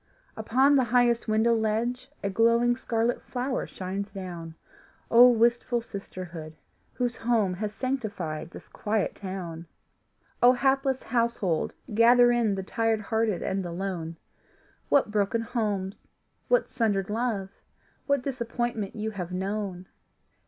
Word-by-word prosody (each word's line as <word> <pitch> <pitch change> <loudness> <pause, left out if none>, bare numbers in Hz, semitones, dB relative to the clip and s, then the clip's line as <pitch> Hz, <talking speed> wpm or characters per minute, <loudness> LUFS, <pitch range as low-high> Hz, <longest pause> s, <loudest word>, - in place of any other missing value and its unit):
Upon 260 +6 +3
the 260 - +3
highest 240 0 +2
window 220 +2 +3
ledge 230 +4 -1
A 200 - 0
glowing 235 +3 +3
scarlet 235 -1 -1
flower 255 +1 -3
shines 195 +2 -5
down. 175 -4 -7 0.6
Oh, 245 +2 +9
wistful 240 +1 +2
sisterhood, 180 -7 -8 0.4
whose 245 -1 -2
home 225 -5 +1
Has 210 +3 -3
sanctified 210 - -3
this - - -12
quiet 210 -1 -1
town! 175 -4 -6 0.7
Oh, 245 +1 +7
hapless 270 +1 +1
household, 230 -8 0 0.2
gather 240 +2 +6
in 230 -4 +2
The 190 - -4
tired 225 +2 0
hearted 220 -2 0
and 190 0 -1
the 175 - -5
lone! 170 -3 -4 0.7
What 275 -7 +3
broken 210 +2 +1
homes, 210 -5 -3 0.4
what - - +3
sundered 205 -4 0
love, 220 -4 -1 0.6
What 280 -2 +2
disappointment 240 -5 -3
you 220 0 -3
have 180 -4 -6
known! 190 0 -3
220 Hz, 125 wpm, -27 LUFS, 195-240 Hz, 0.7 s, Oh